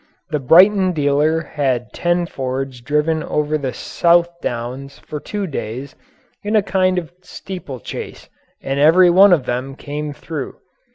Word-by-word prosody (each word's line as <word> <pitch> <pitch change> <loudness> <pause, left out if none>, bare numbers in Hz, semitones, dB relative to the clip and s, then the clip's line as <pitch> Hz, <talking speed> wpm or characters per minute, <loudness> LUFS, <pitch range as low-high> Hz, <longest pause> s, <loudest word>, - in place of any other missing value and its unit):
The 150 - 0
Brighton 185 +7 +5
dealer 150 +1 +1
had 130 -6 -2
ten 175 0 0
Fords 130 -3 -4
driven 150 +4 0
over 150 0 -1
the 140 -4 -2
South 170 +5 +2
Downs 125 +4 -5
for 150 - -7
two 205 +6 -4
days 135 - -6 0.5
in 210 +2 -2
a 210 - +4
kind 185 -2 +1
of 170 -2 -4
steeplechase 180 - -8 0.4
and 135 +1 -2
every 175 +4 +6
one 195 +3 +7
of 155 -8 +3
them 125 +3 -3
came 150 +1 -5
through. 145 0 -6
150 Hz, 140 wpm, -19 LUFS, 135-175 Hz, 0.5 s, one